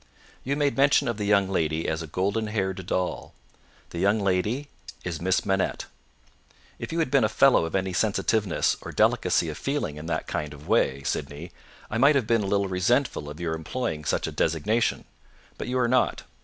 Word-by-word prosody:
"You 140 +2 -1
made 145 -1 +1
mention 140 0 +4
of 115 -3 -1
the 105 - -2
young 100 -2 +4
lady 80 -4 -1
as 80 +1 -1
a 80 - -6
golden 100 +7 -1
haired 95 -3 -2
doll. 90 -1 -2 0.6
The 85 - -5
young 100 +4 +3
lady 105 +8 0 0.4
is 85 -3 -4
Miss 95 +1 +1
Manette. 95 -1 0 0.9
If - - -6
you 165 - -3
had 160 -6 0
been 140 -4 +4
a 110 - +3
fellow 130 -6 +4
of 80 - -4
any 95 -1 -1
sensitiveness 105 -1 +1
or - - -7
delicacy - - +2
of - - -6
feeling 135 - -2
in 75 +2 -7
that 80 -1 -2
kind 75 -1 -4
of 75 +1 -14
way, 70 +1 +2
Sydney, 75 +5 -4 0.4
I 110 - -1
might 140 +4 +6
have 135 -5 +2
been 115 0 +2
a 100 - -2
little 100 0 +1
resentful 95 - 0
of 75 +2 -9
your 85 -2 -2
employing 80 +1 -3
such - - 0
a - - -3
designation; 85 +9 0 0.5
but - - -4
you 125 +1 -1
are 125 -1 +2
not. 130 +1 +1
100 Hz, 195 wpm, -26 LUFS, 85-120 Hz, 0.9 s, might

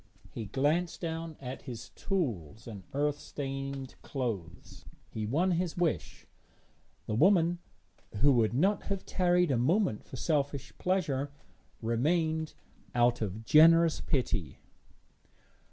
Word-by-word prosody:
He 115 - -5
glanced 150 - 0
down 165 -1 -4
at 130 0 -6
his 120 -3 -8
tools 115 - -3
and 105 -4 -8
earth 145 +1 0
stained 135 -2 -5
clothes. 100 - -5 0.3
He 110 -1 -3
won 170 - +2
his 175 -1 -1
wish; 175 -4 -1 0.8
the - - -3
woman, 175 - +4 0.6
who 145 +1 +6
would 115 -2 +2
not 195 +9 +2
have 195 -2 -3
tarried 180 -3 +2
a 130 - +2
moment 160 - +1
for - - -10
selfish 140 0 -1
pleasure, 150 -7 0 0.5
remained 160 +7 0 0.4
out 120 0 +3
of 110 +1 -4
generous 165 +3 +6
pity. 105 - -1
145 Hz, 120 wpm, -31 LUFS, 120-170 Hz, 0.8 s, who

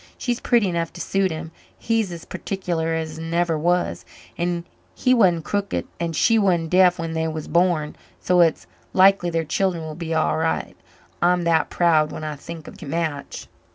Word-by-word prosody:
She's 245 -1 -2
pretty 235 -5 +2
enough 170 -2 -2
to - - -10
suit 195 -1 0
him 160 0 -6 0.3
he's 225 -4 0
as 170 -1 -8
particular 170 -4 -3
as 160 -1 -4
never 165 +1 0
was 175 +3 0 0.3
and 175 0 -2 0.3
he 255 - +2
wan't 180 -9 +3
crooked 200 +2 -2
and 170 -1 -2
she 225 +6 +4
wan't 175 -5 +1
deaf 180 -1 +5
when 165 -1 -4
they 160 0 -1
was 155 -1 -5
born, 170 -4 +1 0.2
so 180 -1 +2
it's 165 -2 +2 0.3
likely 190 -1 +5
their 165 -1 -1
children 175 +2 0
will 155 -1 -6
be 165 +1 -6
all 160 -1 +1
right. 160 0 -1 0.5
I'm 175 0 +3
that 165 -2 +2
proud 160 -3 +3
when - - -7
I 155 -1 -4
think 160 +2 -9
of - - -11
the 155 - -9
match." 155 -1 -3
170 Hz, 185 wpm, -22 LUFS, 160-180 Hz, 0.5 s, deaf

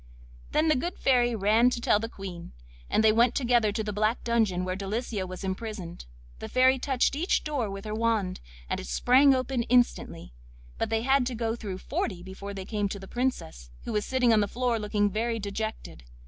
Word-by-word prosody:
Then 310 +1 +2
the 310 - +4
good 345 +8 -3
Fairy 245 -3 +2
ran 220 +4 +4
to 245 - -3
tell 210 -3 +3
the 225 +1 -4
Queen, 185 - -8 0.4
and 215 - +2
they 220 - +6
went 235 +2 +3
together 240 -5 +2
to 220 +2 -2
the 210 -1 -4
black 215 +3 0
dungeon 220 -6 +1
where 185 0 -2
Delicia 200 0 -3
was 185 +1 -8
imprisoned. 190 - -5 0.3
The - - -7
Fairy 260 +1 +4
touched 265 0 +1
each 335 +6 0
door 280 -8 -2
with 195 +1 -7
her 215 - -4
wand, 220 -4 0 0.3
and - - -2
it - - -7
sprang 260 - +5
open 255 -1 -1
instantly, 240 - 0 0.5
but - - -1
they 225 0 0
had 270 -1 +3
to 250 - -3
go 225 0 -1
through 205 -5 -6
forty 185 -1 -3
before 195 +2 -8
they 190 -1 -6
came 205 -1 -1
to 200 - -5
the 195 - -10
Princess, 240 - -3
who - - -5
was 210 -1 0
sitting 250 -1 +2
on 220 - +4
the 205 - +1
floor 245 0 -1
looking 210 -1 +1
very 230 +3 -1
dejected. 210 - -5
220 Hz, 205 wpm, -27 LUFS, 200-245 Hz, 0.5 s, they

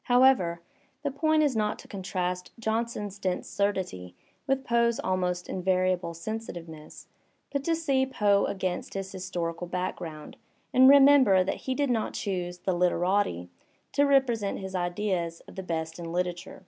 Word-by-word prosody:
However, 245 -10 +4 0.4
the 285 - -1
point 310 +2 +2
is 285 -5 +1
not 210 -1 0
to - - -13
contrast 180 -2 -3
Johnson's 220 -3 -2
dense 185 -2 -2
surdity 185 - -2 0.3
with 270 0 +1
Poe's 235 -1 +2
almost 180 -1 -1
iavariable 185 -2 0
sensitiveness, 170 -5 -7 0.5
but 280 -1 -2
to 330 - +2
see 275 -5 +1
Poe 205 -6 +2
against 185 -2 -3
his 195 0 -4
historical 175 -2 -4
background 170 -3 -5 0.4
and 260 +1 +8
remember 275 -9 +7
that 190 - -4
he 260 - +1
did 285 -2 +1
not 225 -3 -1
choose 180 -3 -3
the 185 +1 -1
"literati" 175 - +1 0.4
to 285 0 +3
represent 245 -7 +2
his 190 -1 -7
idea 175 -1 -1 0.2
of - - -12
the 190 - -4
best 160 -2 -4
in 165 -1 -6
literature. 175 0 -3
190 Hz, 150 wpm, -28 LUFS, 175-235 Hz, 0.5 s, and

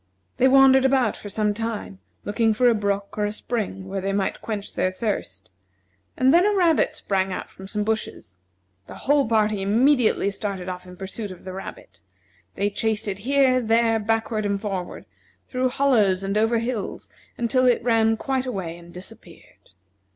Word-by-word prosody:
They 260 - +4
wandered 265 0 +6
about 265 -4 +2
for 205 - -9
some 210 +1 0
time, 210 - -5 0.3
looking 220 +1 +1
for 245 +3 +3
a 240 - +5
brook 200 -1 -2
or 210 - +2
a 205 - -1
spring 210 -3 -4
where 195 0 -3
they 195 +1 -2
might 195 -1 -1
quench 210 -3 -5
their 185 - 0
thirst; 110 - -4 0.7
and 260 +1 +4
then 345 +2 +6
a 415 +1 +2
rabbit 330 -4 +3
sprang 195 -8 -1
out - - -6
from 190 - -11
some 210 +1 -2
bushes. 205 - -4 0.5
The - - -10
whole 285 -1 +3
party 215 -2 +1
immediately 225 0 +3
started 195 -3 -4
off 180 0 -6
in 180 0 -12
pursuit 195 +3 -6
of 185 - -11
the 185 - -7
rabbit. 185 - -10 0.5
They 205 +1 0
chased 220 +1 -1
it 200 -1 -3
here, 260 +2 +3
there, 225 0 +2
backward 220 0 -1
and 200 -1 -1
forward, 195 -4 -5 0.4
through 255 0 0
hollows 225 -9 +2
and 195 +1 -2
over 225 +2 +2
hills, 230 -3 -4 0.3
until 255 +2 +2
it 245 - +2
ran 225 -2 +3
quite 265 +1 -2
away 185 -8 -4
and 170 0 -14
disappeared. 180 +2 -13
215 Hz, 175 wpm, -23 LUFS, 195-245 Hz, 0.7 s, wandered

